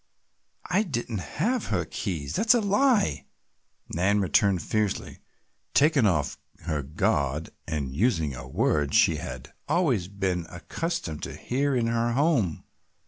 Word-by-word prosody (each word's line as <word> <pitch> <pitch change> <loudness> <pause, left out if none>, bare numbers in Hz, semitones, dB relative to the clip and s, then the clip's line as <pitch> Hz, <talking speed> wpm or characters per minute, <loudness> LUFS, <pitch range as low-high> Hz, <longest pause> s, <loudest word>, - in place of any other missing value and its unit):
"I 185 +4 +2
didn't 120 - -3
have 175 - -1
her 90 -5 0
keys, 80 -8 -4
that's 235 +2 +4
a - - +4
lie," 205 - +2 0.7
Nan 95 +5 +2
returned 95 -1 +2
fiercely, 105 -2 -2 0.6
taken 145 -5 +5
off 75 -7 0 0.2
her 75 -2 -1
guard 70 +1 -1 0.2
and 70 -5 -3
using 85 - +1
a 65 0 -8
word 75 +2 +1
she - - +5
had 65 -1 -7 0.2
always 130 - +2
been 95 -4 -2
accustomed 90 - -4
to - - -5
hear 140 +2 -1
in 120 -2 +1
her 115 0 +1
home. 130 - +1
100 Hz, 135 wpm, -27 LUFS, -, 0.7 s, taken